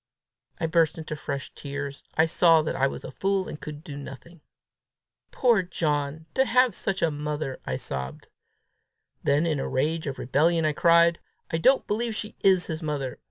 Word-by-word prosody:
I - - 0
burst 165 -1 +2
into 155 -1 -5
fresh 140 -2 -5
tears. 140 -1 -6
I 160 - +5
saw 165 -1 +4
that 155 - -2
I 135 +1 +2
was - - -6
a - - -7
fool, 195 -1 0
and 150 - -8
could 150 0 -7
do 145 - -8
nothing. 145 +4 -10 0.9
"Poor 235 -6 +3
John! 155 -3 -2
To 265 - +4
have 250 -2 +3
such 190 0 -2
a 165 - +3
mother!" 150 -2 -4
I 65 - -1
sobbed. 65 -1 -5 0.9
Then 145 +3 +2
in 155 -4 0
a - - -3
rage 155 +4 0
of 135 - -4
rebellion 160 +5 +2
I 155 - +2
cried, 170 +1 +4 0.3
"I 160 - 0
don't 265 +10 +4
believe 225 +1 -1
she 210 0 -5
is 190 -2 +4
his 160 0 -5
mother! 145 -5 -3
160 Hz, 180 wpm, -26 LUFS, 145-175 Hz, 0.9 s, I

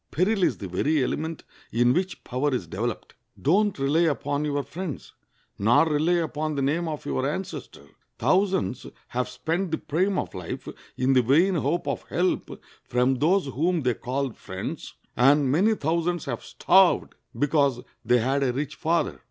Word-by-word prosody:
Peril 190 +4 +1
is 125 - +2
the 95 - -6
very 140 - +1
element 160 +5 -3 0.3
in 120 +2 +3
which 185 +4 -2
power 130 +4 -1
is 105 - -3
developed. 110 +7 -4 0.3
Don't 200 +7 +2
rely 140 +4 +1
upon 145 -3 0
your 145 -1 -1
friends, 175 -2 -7 0.5
nor 115 +9 +5
rely 155 +3 +2
upon 155 -3 -1
the 140 - -1
name 165 +5 0
of 155 -2 -5
your 65 -2 -1
ancestor. - - -6 0.3
Thousands 185 - +1 0.2
have 125 +1 -2
spent 165 +9 -2
the 160 - -1
prime 185 +6 0
of - - -3
life 90 -2 -6 0.3
in 130 +1 +2
the 130 - +5
vain 155 +11 +3
hope 160 +1 -1
of - - -2
help 180 +1 -1 0.2
from 125 +2 +1
those 180 +5 +3
whom 160 +6 0
they 125 -2 +1
called 130 +1 -3
friends, 95 0 -7 0.2
and 135 +2 +4
many 200 +9 +3
thousands 170 +1 -1
have 120 -4 -4
starved 190 -1 +3 0.2
because 140 -4 +2 0.2
they 125 - +4
had 135 +4 +1
a 135 -2 +2
rich 140 +3 -3
father. 165 +1 0
145 Hz, 165 wpm, -25 LUFS, 125-170 Hz, 0.5 s, nor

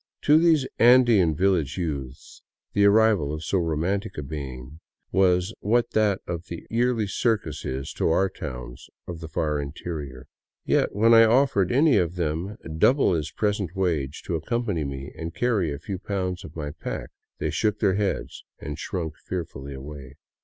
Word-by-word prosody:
To 150 +2 +6
these 160 -5 +3
Andean 115 -9 +6
village 90 -4 +1
youths 70 -7 -5 0.3
the 100 - +4
arrival 100 -7 +4
of 75 +1 -5
so 95 +5 0
romantic 85 +6 -1
a 75 - -3
being 70 0 -7 0.3
was 90 +1 +2
what 120 +3 +1
that 105 -3 +2
of 85 0 -5
the 85 - -7
yearly 120 -1 +1
circus 110 +2 -1
is 65 +1 -4
to - - 0
our 95 +4 +3
towns 60 -8 -8 0.2
of 85 -2 -6
the 80 - -7
far 75 -1 -1
interior. 70 -2 -6 0.4
Yet - - +1
when 115 +3 +5
I 115 0 +8
offered 115 -6 +3
any 145 +2 +4
of 85 0 0
them 85 +5 -2 0.2
double 130 - +4
his 80 -2 -1
present 100 -1 -2
wage 80 -7 -1
to - - -4
accompany 100 -1 -1
me 70 0 -6
and 80 +1 -6
carry 105 -10 +1
a 70 - -4
few 95 +5 -6
pounds 90 -3 -3
of 75 - -11
my 75 -3 -4
pack, 75 - -6 0.3
they - - -2
shook 105 -1 0
their 100 -3 +2
heads 100 0 -2
and - - -7
shrunk 80 -4 -4
fearfully 70 -6 -6
away. 70 -1 -9
90 Hz, 165 wpm, -25 LUFS, 75-105 Hz, 0.4 s, I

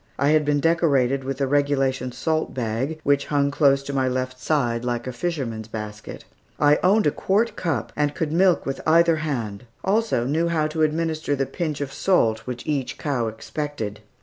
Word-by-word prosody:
I 140 - +2
had 155 -1 +3
been 145 0 +2
decorated 140 -5 +2
with 135 0 -3
the 140 - +1
regulation 135 -2 +1
salt 155 +6 -2
bag, 125 +6 -2
which 140 0 +2
hung 140 -1 +1
close 140 -2 +3
to 140 - -5
my 130 -1 +1
left 130 0 -2
side, 120 -6 0
like 120 -1 -2
a 130 - -3
fisherman's 125 -7 -3
basket. 105 -1 -7 0.3
I 150 0 +4
owned 205 +4 +4
a 150 - +4
quart 210 +9 0
cup 145 -11 -2
and 145 -1 0
could 160 -2 -2
milk 180 +2 +3
with 135 - -3
either 165 0 +5
hand, 120 -9 -3 0.2
also 210 - +1
knew 160 +6 +1
how 160 -2 +1
to 160 +1 -3
administer 155 -1 0
the 135 0 0
pinch 155 -1 -3
of 140 -2 -4
salt 115 - +1
which 125 -1 -5
each 140 -4 -2
cow 135 -6 -1
expected. 110 -1 -5
140 Hz, 185 wpm, -23 LUFS, 125-155 Hz, 0.3 s, either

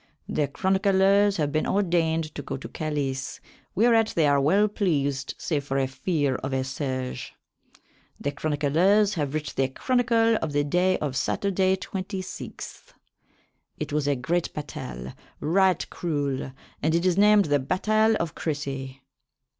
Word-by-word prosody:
The 150 - 0
chronyclers 195 +4 +3
have 150 -3 0
been 155 - 0
ordayned 165 -5 +1
to - - -5
go 135 - -5
to - - -8
Calys, 140 -4 -3 0.4
whereat 225 +1 +3
they 165 - +3
are 140 -1 +3
well 195 +9 +4
pleased 145 -10 -1
save 150 -4 -2
for 135 -1 -2
a 135 - +2
feare 140 0 -1
of 135 0 -4
a 130 0 0
siege. 130 -2 -4 0.8
The 145 - -2
chronyclers 160 +9 +2
have 150 -5 -2
writ 150 -2 -3
the 135 - +2
chronycle 230 - +2
of 160 -6 -3
the 145 0 +2
Day 180 +5 +2
of 140 -3 -3
Saturday, 190 +4 +1
August 190 - -3
26. 190 -1 -6 0.8
It 150 -1 -5
was 150 -1 0
a 145 - +2
great 165 +7 -1
batayle, 65 - -6 0.3
ryght 185 +3 +2
cruell, 145 -5 -2 0.3
and 160 +2 +2
it 170 +2 +1
is 180 -2 +3
named 205 0 +5
the 145 -1 +2
batayle 215 +9 +2
of 170 -6 -2
Cressey. 135 -3 -4
155 Hz, 150 wpm, -26 LUFS, 140-190 Hz, 0.8 s, named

